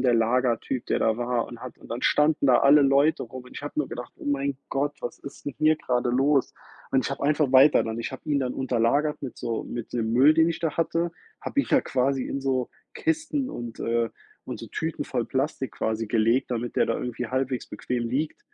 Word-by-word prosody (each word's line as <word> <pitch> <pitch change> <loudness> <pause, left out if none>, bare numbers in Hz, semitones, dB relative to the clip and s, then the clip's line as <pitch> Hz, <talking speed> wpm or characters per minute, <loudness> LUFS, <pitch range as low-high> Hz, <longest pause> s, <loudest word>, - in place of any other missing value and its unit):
der 125 -2 +3
Lagertyp, 120 +2 +1
der - - 0
da 110 -1 +2
war 120 0 0
und 120 -1 -10
hat 130 - -8
und - - -16
dann 120 +2 -4
standen 150 -1 +3
da 125 -2 +6
alle 145 +1 +7
Leute 140 +3 +3
rum. 125 +2 -9
Und 125 - -15
ich - - -7
habe 145 - -6
nur 150 -3 0
gedacht: 120 0 -7
„Oh - - -12
mein 140 -1 0
Gott, 145 +2 -1
was 120 - -5
ist 140 - -11
'n 145 - -4
hier 155 0 +5
grade 125 -3 -1
los?“ 135 +2 +2 0.4
Und 130 -1 +3
ich - - -2
habe 140 +1 -3
einfach 150 -1 +2
weiter 135 +3 +7
dann. 115 0 -4
Ich 115 - -4
habe 130 - -8
ihn 145 - +3
dann 130 -2 -2
unter 130 -3 -1
lagert 145 +6 +2
mit 135 - -6
so 115 -2 -3
mit 120 -2 -6
dem 115 -2 -1
Müll, 135 +5 +6
den 160 +1 +4
ich 165 0 -3
da 165 -3 -1
hatte. 170 +1 0 0.3
Habe 280 - 0
ihn - - -4
da 275 - +4
quasi 135 - 0
in 140 - -3
so 130 -2 -1 0.2
Kisten 315 -4 -1
und, 120 -1 -7
äh 115 0 +1 0.4
und - - -6
so - - -7
Tüten - - -3
voll - - -2
Plastik - - -2
quasi 110 0 -2
gelegt, 115 +4 +2
damit 120 0 -3
der - - +3
da - - 0
irgendwie 120 -1 -3
halbwegs 130 +1 -2
bequem 120 -2 -3
liegt, 145 +6 -2
130 Hz, 235 wpm, -26 LUFS, 120-145 Hz, 0.4 s, alle